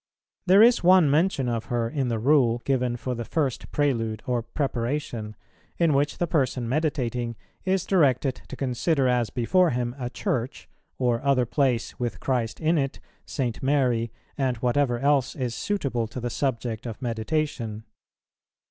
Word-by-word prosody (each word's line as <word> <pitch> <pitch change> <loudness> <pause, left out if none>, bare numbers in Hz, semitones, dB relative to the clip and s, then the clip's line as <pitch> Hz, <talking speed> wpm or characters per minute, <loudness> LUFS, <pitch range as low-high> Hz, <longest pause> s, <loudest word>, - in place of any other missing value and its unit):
There 195 +4 +7
is 240 -3 +5
one 180 -4 +6
mention 150 -4 +2
of 115 -2 -2
her 120 -1 -1
in 135 +2 -2
the 115 -2 0
rule 120 -1 +3
given 125 -3 0
for 125 +1 -3
the 120 -1 -4
first 140 0 -2
Prelude 115 -7 0
or 125 -3 0
preparation, 120 -3 -3 0.4
in 165 -3 +3
which 145 +2 +1
the 175 - +1
person 135 -7 0
meditating 125 -4 -1 0.3
is 190 -1 +1
directed 135 -7 +2
to - - -7
consider 135 +2 0
as 120 -3 +1
before 170 - +2
him 120 -2 -1
a 125 -1 -3
church, 125 +1 -3 0.3
or 120 -2 +1
other 135 -3 +3
place 130 -1 0
with 120 -1 -3
Christ 120 -4 -1
in 160 0 +2
it, 135 -1 -2 0.3
St. 125 -5 -3
Mary, 125 -5 +1 0.3
and 130 -3 +1
whatever 125 +1 +1
else 140 0 +1
is 125 -3 -2
suitable 135 - -2
to 115 +3 -7
the 120 0 -3
subject 120 -3 -2
of 115 - -6
meditation. 115 -2 -2
125 Hz, 155 wpm, -25 LUFS, 120-145 Hz, 0.4 s, There